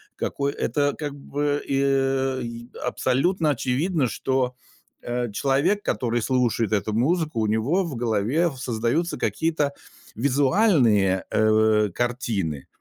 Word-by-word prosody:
Какой 140 0 -2
Это, 145 -1 0
как 145 -2 -4
бы, 145 +1 -2
э, 135 -1 +1
и 115 0 -7 0.2
абсолютно 155 +6 +1
очевидно, 145 +3 0
что, 125 +2 -1 0.5
э, 120 -2 -3
человек, 140 - +1
который 120 -1 -1
слушает 120 -3 +1
эту 105 +1 0
музыку, 155 +2 0
у 110 - +1
него 120 - +1
в 165 -6 -5
голове 120 +8 +1
в 135 - -10
создаются 125 +7 -1
какие-то 155 -3 0 0.4
визуальные, 130 - +3
э, 110 -1 +3
картины. 115 - -2
130 Hz, 115 wpm, -24 LUFS, 115-145 Hz, 0.5 s, визуальные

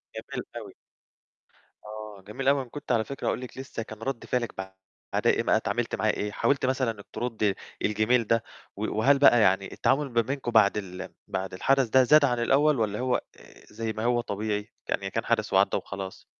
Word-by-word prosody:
جميل - - -6
أوي. - - -8 1.1
آه، 105 -1 -8
جميل 130 +6 -4
أوي 140 0 +4
أنا 130 - -9
كنت 145 +1 -6
على 115 -2 +3
فكرة 140 - -5
هاقول - - 0
لِك 125 - -9
لسّه 130 -3 -5
كان 110 -1 -10
رَد 130 +1 -4
فعلِك 120 -3 -1
بعد 95 0 -5
آآ، - - +3
ما - - +3
اتعاملت - - -1
معاها - - +1
إيه، 105 - -3
حاولتِ 135 +6 +1
مثلًا 130 -2 +1
إنِّك 100 -2 -12
ترُدّي 110 -5 -1 0.3
الجِمِيل 110 +2 +2
ده 115 0 +2 0.3
و 105 +1 -3
وهل 135 +6 +4
بقى 120 -4 +7
يعني 95 -1 +2
التعامل 140 +1 +1
ما 120 0 +3
بينكم 130 +1 -3
بعد 105 -3 +5
ال 95 -2 -6 0.2
بعد 95 -1 -3
الحَدَث 135 +7 +2
ده 130 +3 +6
زاد 150 +3 +6
عن 125 -3 0
الأول، 140 +3 +3
والَّا 105 -2 0
هو 125 0 +1
آآ، - - -9
زي 110 0 -3
ما 110 +1 -4
هو 120 0 +2
طبيعي، 105 0 -3 0.2
يعني - - -1
كان - - -3
حدث - - 0
وعَدّى - - +4
وخلاص؟ 95 -1 -7
115 Hz, 200 wpm, -27 LUFS, 105-130 Hz, 1.1 s, بقى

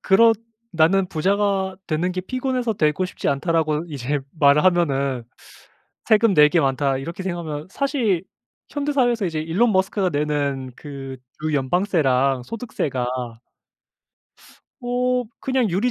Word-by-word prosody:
그렇 225 +4 +5 0.4
"나는 175 +4 +3
부자가 190 +2 0
되는 175 +3 -1
게 185 - -2
피곤해서 255 +2 -2
되고 155 +2 +1
싶지 180 - -4
않다."라고 155 +1 0
이제 145 -1 -2 0.2
말을 145 0 +5
하면은 140 -9 +1 0.8
'세금 215 -2 +4
낼 150 0 +7
게 170 - +3
많다.' 135 0 +1
이렇게 170 +7 -6
생각하면 165 -4 -4
사실 230 - 0 0.4
현대 290 0 -2
사회에서 240 -6 +2
이제 160 -3 -2
일론 195 +9 +1
머스크가 190 0 +1
내는 145 -3 -1
그 135 -3 -8 0.3
주 155 -1 -1
연방세랑 135 -4 +1
소득세가 150 - -3 1.8
어 250 0 0 0.2
그냥 260 -4 +1
유리 200 +8 +1
170 Hz, 285 characters per minute, -22 LUFS, 145-210 Hz, 1.8 s, 낼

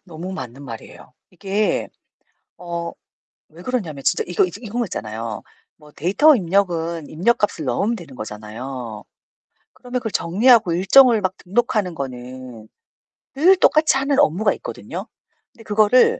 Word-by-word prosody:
너무 175 +3 -7
맞는 130 -5 -7
말이에요. 115 +1 -10 0.2
이게 195 +3 -1 0.7
어 170 -1 -5 0.6
왜 170 - -12
그러냐면 180 - -3
진짜 - - +2
이거 180 +1 +2
이 180 - -7
저 205 - -10
이런 230 +1 -4
거 235 - +1
있잖아요. 110 - -5 0.3
뭐 150 -1 -17
데이터 205 - +4
입력은 170 -5 0
입력값을 190 -2 0
넣으면 200 - 0
되는 160 - -11
거잖아요. 110 +2 -7 0.7
그러면 250 0 -4
그걸 220 -4 -4
정리하고 210 +2 +4
일정을 220 +5 +6
막 185 0 0
등록하는 200 -2 -1
거는 125 -4 -8 0.7
늘 360 +7 +5
똑같이 310 -5 +4
하는 275 +1 0
업무가 200 - +3
있거든요? - - -7 0.5
근데 225 - -16
그거를 220 - +4
180 Hz, 320 characters per minute, -21 LUFS, 140-225 Hz, 0.7 s, 일정을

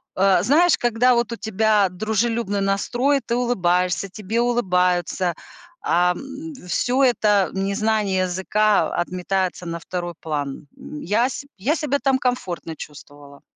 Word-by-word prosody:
а, 190 -2 +4
знаешь, 315 +9 +4
когда 240 +1 +3
вот 235 0 0
у - - -3
тебя 215 -1 +2
дружелюбный 220 +1 -1
настрой, 240 +8 +1
ты 235 - -1
улыбаешься, 180 -6 +1
тебе 215 +3 -3
улыбаются, 180 -6 +1 0.5
а, 180 +1 +2
м, 275 - -8
всё 255 +8 +1
это 210 -6 +3
незнание 200 0 0
языка, 200 +3 +1
о, - - -2
отметается 185 +1 -2
на 170 0 -4
второй 175 0 -5
план. 145 -2 -4
М, 150 - -9
я 220 +7 +2
се 270 +2 -7
я 255 +11 0
себя 285 -3 -1
там 270 0 +2
комфортно 185 -10 -3
чувствовала. 145 -1 -12
200 Hz, 135 wpm, -22 LUFS, 180-240 Hz, 0.5 s, а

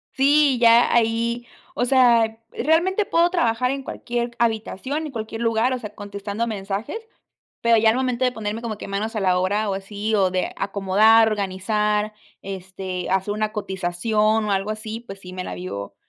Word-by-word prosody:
Sí, 280 -1 +4
ya 235 0 +5
ahí, 235 +1 +1 0.3
o 245 - 0
sea, 235 -4 +4
realmente 345 - +1
puedo 340 -1 +3
trabajar 250 -8 +1
en 275 0 -3
cualquier 240 -2 -3
habitación, 235 +6 -1
en 300 - -6
cualquier 225 -1 -5
lugar, 230 +1 +1
o 255 - -2
sea, 210 -3 -9
contestando 205 +2 -4
mensajes, 205 - -4 0.6
pero, 235 -1 +4
ya 220 0 +4
al 225 - 0
momento 255 -1 0
de 250 - 0
ponerme 220 -1 -4
como 230 -2 -4
que - - -8
manos 215 +3 -3
a - - 0
la 185 -2 +2
obra, 205 +3 0
o - - -1
así 205 +3 -3
o 195 -3 +3
de 185 0 -1
acomodar, 205 +3 +4
organizar, 210 +1 -1 0.3
este, 190 -1 -6
hacer 190 +2 0
una 215 0 -2
cotización 210 +3 0
o - - -2
algo 195 +1 0
así, 215 +1 -5
pues 195 -5 -11
sí, 180 -1 -10
me 185 0 -5
la - - -5
vivo 100 - -6
220 Hz, 180 wpm, -22 LUFS, 195-235 Hz, 0.6 s, ya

